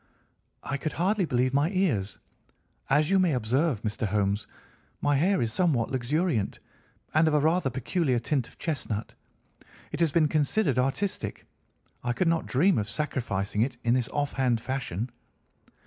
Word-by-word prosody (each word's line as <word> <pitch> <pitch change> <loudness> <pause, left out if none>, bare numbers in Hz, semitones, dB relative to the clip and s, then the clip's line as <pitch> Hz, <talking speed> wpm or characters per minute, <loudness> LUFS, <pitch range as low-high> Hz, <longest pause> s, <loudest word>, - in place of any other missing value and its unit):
"I 135 - -2
could 155 +2 -3
hardly 190 +3 +1
believe 130 -3 +1
my 145 +4 +3
ears. 145 - 0 0.7
As 150 +5 +3
you 195 - +5
may 175 -6 +3
observe, 125 +2 0
Mr. 110 0 -1
Holmes, 100 +1 0 0.5
my 145 0 +2
hair 180 +3 +2
is 110 -1 -1
somewhat 145 -10 +1
luxuriant, 130 - 0 0.6
and 160 +1 +4
of 155 - +2
a - - +5
rather 160 0 +2
peculiar 135 +1 0
tint 125 +1 -1
of - - -17
chestnut. 120 -9 -3 0.8
It - - -4
has 165 -3 +3
been 155 0 +4
considered 150 0 +1
artistic. 135 +10 -2 0.6
I 120 0 0
could 165 +9 0
not 165 0 +1
dream 170 - +3
of 105 0 -3
sacrificing 105 -6 -2
it 120 +1 0
in 115 - +3
this 125 -2 0
offhand 135 -5 0
fashion. 120 -3 -3
135 Hz, 155 wpm, -27 LUFS, 120-160 Hz, 0.8 s, you